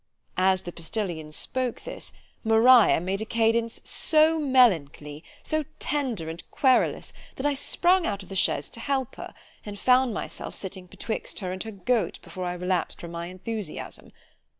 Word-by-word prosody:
As 185 Hz, 0 st, +3 dB
the 175 Hz, -, -6 dB
postillion 170 Hz, -3 st, -4 dB
spoke 255 Hz, +9 st, -2 dB
this, -, -, -6 dB, 0.3 s
MARIA 225 Hz, 0 st, +6 dB
made 190 Hz, +4 st, -2 dB
a -, -, -2 dB
cadence 230 Hz, 0 st, +1 dB
so 315 Hz, +1 st, +4 dB
melancholy, 170 Hz, -, +2 dB, 0.2 s
so 310 Hz, 0 st, 0 dB
tender 255 Hz, -, -2 dB
and 165 Hz, +2 st, -5 dB
querulous, 260 Hz, -2 st, +2 dB, 0.2 s
that 265 Hz, -, -5 dB
I 290 Hz, -, +3 dB
sprung 350 Hz, +6 st, +2 dB
out 200 Hz, -1 st, -3 dB
of -, -, -16 dB
the 195 Hz, -, -6 dB
chaise 185 Hz, -, +1 dB
to -, -, -8 dB
help 265 Hz, 0 st, -2 dB
her, -, -, -7 dB, 0.3 s
and 205 Hz, -1 st, -7 dB
found 255 Hz, +2 st, +4 dB
myself -, -, -5 dB
sitting 190 Hz, -1 st, -5 dB
betwixt 220 Hz, +3 st, -4 dB
her 185 Hz, -1 st, -3 dB
and 185 Hz, 0 st, -5 dB
her 225 Hz, -, -5 dB
goat 215 Hz, +4 st, 0 dB
before 185 Hz, -2 st, -6 dB
I 175 Hz, -, -2 dB
relapsed 180 Hz, 0 st, -2 dB
from 170 Hz, -, -8 dB
my 170 Hz, 0 st, -5 dB
enthusiasm. 190 Hz, 0 st, -5 dB
215 Hz, 165 wpm, -26 LUFS, 180-255 Hz, 0.3 s, MARIA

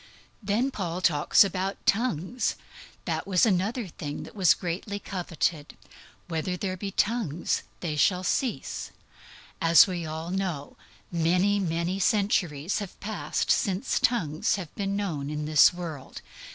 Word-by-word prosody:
Then 220 Hz, +6 st, 0 dB
Paul 180 Hz, -6 st, -3 dB
talks 160 Hz, -1 st, +5 dB
about 195 Hz, 0 st, -3 dB
tongues. 225 Hz, +1 st, 0 dB, 0.5 s
That -, -, -2 dB
was 185 Hz, 0 st, +4 dB
another 215 Hz, +4 st, 0 dB
thing 150 Hz, -3 st, -6 dB
that -, -, -11 dB
was 190 Hz, -4 st, +5 dB
greatly 185 Hz, +3 st, -4 dB
coveted. 175 Hz, -6 st, -3 dB, 0.5 s
"Whether 175 Hz, +2 st, -2 dB
there 185 Hz, 0 st, -2 dB
be 195 Hz, +2 st, -5 dB
tongues, 195 Hz, -6 st, 0 dB, 0.2 s
they 160 Hz, -4 st, -2 dB
shall 180 Hz, +5 st, +3 dB
cease." 220 Hz, -, -2 dB, 0.7 s
As 165 Hz, 0 st, +8 dB
we 180 Hz, -3 st, -4 dB
all 160 Hz, +2 st, -5 dB
know, 185 Hz, -7 st, -3 dB, 0.4 s
many 180 Hz, +4 st, +2 dB
many 170 Hz, +1 st, -1 dB
centuries 185 Hz, -6 st, +1 dB
have 200 Hz, -3 st, -8 dB
passed 210 Hz, +1 st, -2 dB
since 190 Hz, 0 st, +1 dB
tongues 190 Hz, -4 st, +1 dB
have 180 Hz, -6 st, -7 dB
been 200 Hz, -1 st, -2 dB
known 165 Hz, -9 st, -2 dB
in 150 Hz, 0 st, -3 dB
this 155 Hz, -1 st, +6 dB
world. 165 Hz, -6 st, -7 dB
180 Hz, 135 wpm, -27 LUFS, 165-200 Hz, 0.7 s, As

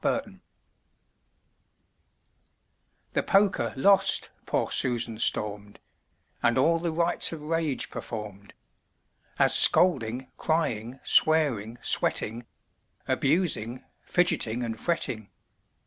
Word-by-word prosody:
Nelson] -, -, -3 dB, 2.7 s
THE -, -, 0 dB
poker 200 Hz, -1 st, +1 dB
lost, 195 Hz, +8 st, +3 dB, 0.2 s
poor -, -, -2 dB
Susan 115 Hz, -3 st, +2 dB
storm'd, 105 Hz, -2 st, -2 dB, 0.6 s
And 120 Hz, +1 st, +1 dB
all 165 Hz, +5 st, +2 dB
the 170 Hz, 0 st, -3 dB
rites 170 Hz, +2 st, 0 dB
of 165 Hz, -2 st, -8 dB
rage 160 Hz, -3 st, -2 dB
perform'd; 105 Hz, -3 st, -8 dB, 0.8 s
As -, -, +3 dB
scolding, 130 Hz, -7 st, +4 dB
crying, 130 Hz, -7 st, -2 dB
swearing, 125 Hz, -9 st, +1 dB
sweating, 115 Hz, +2 st, 0 dB, 0.6 s
Abusing, 140 Hz, -, -1 dB, 0.2 s
fidgetting, 125 Hz, -9 st, 0 dB
and 115 Hz, -2 st, -5 dB
fretting. 120 Hz, -, -3 dB
130 Hz, 85 wpm, -26 LUFS, 110-165 Hz, 2.7 s, scolding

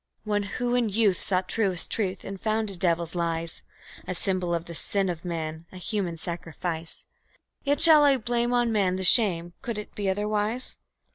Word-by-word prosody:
One 210 Hz, -1 st, 0 dB
who 240 Hz, +4 st, -2 dB
in 245 Hz, -3 st, +2 dB
youth 205 Hz, -3 st, +2 dB
sought 185 Hz, -1 st, -1 dB
truest 190 Hz, -6 st, 0 dB
truth 195 Hz, -4 st, -2 dB
and 195 Hz, -1 st, -7 dB
found 215 Hz, -1 st, 0 dB
a -, -, -2 dB
devil's 170 Hz, -2 st, 0 dB
lies; 165 Hz, -1 st, -1 dB, 0.5 s
A 185 Hz, -, -3 dB
symbol 185 Hz, -1 st, 0 dB
of 170 Hz, -1 st, -1 dB
the 170 Hz, -, -8 dB
sin 195 Hz, +3 st, +1 dB
of 170 Hz, -2 st, -4 dB
man, 160 Hz, -2 st, -4 dB
a 185 Hz, -, -10 dB
human 180 Hz, -2 st, -3 dB
sacrifice. 165 Hz, 0 st, -5 dB, 0.6 s
Yet 285 Hz, 0 st, +1 dB
shall 315 Hz, -3 st, +8 dB
I 280 Hz, -2 st, +5 dB
blame 240 Hz, +1 st, 0 dB
on 240 Hz, -1 st, +2 dB
man 195 Hz, -4 st, +2 dB
the 190 Hz, -, -3 dB
shame? 180 Hz, -4 st, +4 dB
Could 235 Hz, -4 st, -4 dB
it 210 Hz, -, -7 dB
be 200 Hz, -2 st, -2 dB
otherwise? 210 Hz, +4 st, 0 dB
195 Hz, 185 wpm, -26 LUFS, 170-220 Hz, 0.6 s, shall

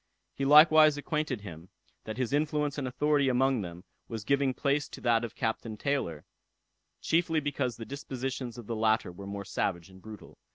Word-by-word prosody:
He 140 Hz, -, -3 dB
likewise 155 Hz, +1 st, +7 dB
acquainted 150 Hz, -5 st, -2 dB
him, 85 Hz, -3 st, -10 dB, 0.4 s
that 110 Hz, 0 st, -6 dB
his 130 Hz, 0 st, -2 dB
influence 150 Hz, -1 st, 0 dB
and 130 Hz, -, -3 dB
authority 145 Hz, +1 st, +2 dB
among 130 Hz, -1 st, +2 dB
them 85 Hz, -1 st, -8 dB, 0.2 s
was 115 Hz, -2 st, -6 dB
giving 140 Hz, +3 st, +2 dB
place 140 Hz, +2 st, 0 dB
to -, -, -10 dB
that 120 Hz, -1 st, +2 dB
of 115 Hz, -, -6 dB
Captain 110 Hz, -1 st, -3 dB
Taylor, 120 Hz, -, -2 dB, 0.8 s
chiefly 165 Hz, -1 st, +1 dB
because 140 Hz, -4 st, -2 dB
the 115 Hz, -, -7 dB
dispositions 130 Hz, -2 st, -5 dB
of 120 Hz, -, -9 dB
the 115 Hz, -, -4 dB
latter 110 Hz, -3 st, +1 dB
were 100 Hz, +3 st, -10 dB
more 100 Hz, 0 st, -5 dB
savage 90 Hz, -2 st, -2 dB
and 95 Hz, 0 st, -16 dB
brutal. 110 Hz, 0 st, -12 dB
125 Hz, 175 wpm, -29 LUFS, 110-145 Hz, 0.8 s, likewise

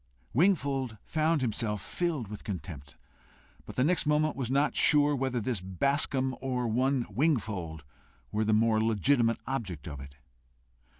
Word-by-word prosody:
Wingfold 135 Hz, -, +1 dB
found 160 Hz, -1 st, +1 dB
himself 110 Hz, -3 st, -1 dB
filled 155 Hz, -, -2 dB
with 105 Hz, +1 st, -8 dB
contempt, 75 Hz, -7 st, -7 dB, 0.7 s
but -, -, -8 dB
the 125 Hz, -, +2 dB
next 165 Hz, +1 st, +2 dB
moment 150 Hz, +1 st, +2 dB
was 130 Hz, -4 st, -3 dB
not 140 Hz, +3 st, +1 dB
sure 145 Hz, -1 st, +5 dB
whether 130 Hz, -2 st, -1 dB
this 115 Hz, -1 st, -1 dB
Bascombe 130 Hz, -, 0 dB
or 125 Hz, -2 st, -1 dB
one 125 Hz, +2 st, +1 dB
Wingfold 100 Hz, -, -1 dB, 0.5 s
were 110 Hz, +1 st, 0 dB
the 110 Hz, -, +1 dB
more 110 Hz, 0 st, +3 dB
legitimate 115 Hz, +2 st, +2 dB
object 100 Hz, -, -4 dB
of 70 Hz, -, -6 dB
it. 70 Hz, 0 st, -11 dB
125 Hz, 140 wpm, -29 LUFS, 105-140 Hz, 0.7 s, sure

